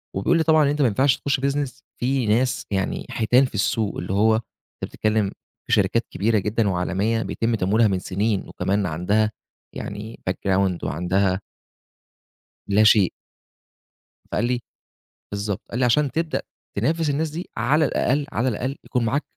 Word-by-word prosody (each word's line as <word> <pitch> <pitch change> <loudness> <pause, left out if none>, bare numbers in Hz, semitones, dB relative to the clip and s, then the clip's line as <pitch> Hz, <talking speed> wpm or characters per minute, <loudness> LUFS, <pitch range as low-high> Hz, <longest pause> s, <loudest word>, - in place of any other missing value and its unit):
وبيقول 130 - +2
لي 165 - +2
طبعًا 155 -1 +5
إن - - +2
أنت 145 +1 0
ماينفعش 130 +2 +3
تخُش 140 -2 0
business 140 -1 -2 0.2
في 130 0 +1
ناس، 125 +5 +1
يعني 95 -1 -1
حيتان 125 +4 +3
في 125 - -7
السوق، 105 +1 0
اللي 90 +2 -3
هو 110 +3 +4
أنت 110 - 0 0.5
بتتكلِّم 110 -2 0 0.4
في - - 0
شركات - - +2
كبيرة 110 +3 +1
جدًا 105 +1 0
وعالمية 95 +5 0
بيتم 115 0 -1
تمويلها 110 +3 +3
من 95 -2 0
سِنين 100 +2 -1
وكمان 100 +2 -1
عندها 100 +6 +1 0.4
يعني 105 +3 -6
background 95 -1 0
وعندها 95 +4 0 1.3
لا 105 +2 +4
شيء. 105 -4 +5 1.1
فقال 105 - -2
لي 125 0 0 0.7
بالضبط 100 -1 -2
قال 120 - -3
لي: 130 - +3
"عشان 135 +3 +3
تبدأ 165 -1 -1 0.4
تنافس 155 +8 +1
الناس 155 +3 0
دي 165 +4 -6
على 145 +7 +3
الأقل، 140 +1 +1
على 120 +4 0
الأقل 130 +4 -3
يكون 125 -3 0
معاك 140 +6 0
110 Hz, 155 wpm, -23 LUFS, 100-135 Hz, 1.3 s, طبعًا